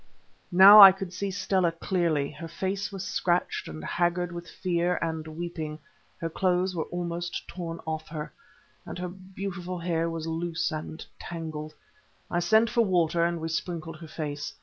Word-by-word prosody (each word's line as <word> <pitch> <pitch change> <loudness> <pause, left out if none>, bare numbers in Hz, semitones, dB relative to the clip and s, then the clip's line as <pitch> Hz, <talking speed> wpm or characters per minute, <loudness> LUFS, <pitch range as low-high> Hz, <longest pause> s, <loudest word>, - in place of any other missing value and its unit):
Now 195 +4 +10
I 195 -1 +13
could 190 -1 -6
see 200 +2 -3
Stella 185 -2 +1
clearly. 165 -5 0
Her 165 +2 -8
face 190 +5 -3
was 195 -1 -5
scratched, 180 -1 0
and 80 0 -8
haggard 175 0 0
with 170 0 -8
fear 175 -1 0
and 160 -1 -3
weeping, 155 -1 -5 0.4
her 165 - -2
clothes 180 +2 0
were 160 - -1
almost 175 0 -4
torn 170 -2 -6
off 160 0 -4
her, 150 -1 -6 0.5
and - - -8
her 180 0 -4
beautiful 185 -1 -6
hair 170 -1 -1
was 165 -1 -4
loose 165 +1 -2
and 155 +1 -6
tangled. 155 -2 -6 0.6
I 175 - +1
sent 220 +6 +4
for 235 +1 +2
water, 170 -4 +2
and 170 0 0
we 160 - -3
sprinkled 165 -1 -4
her 165 0 -10
face. 145 -2 -5
170 Hz, 165 wpm, -27 LUFS, 160-185 Hz, 0.6 s, I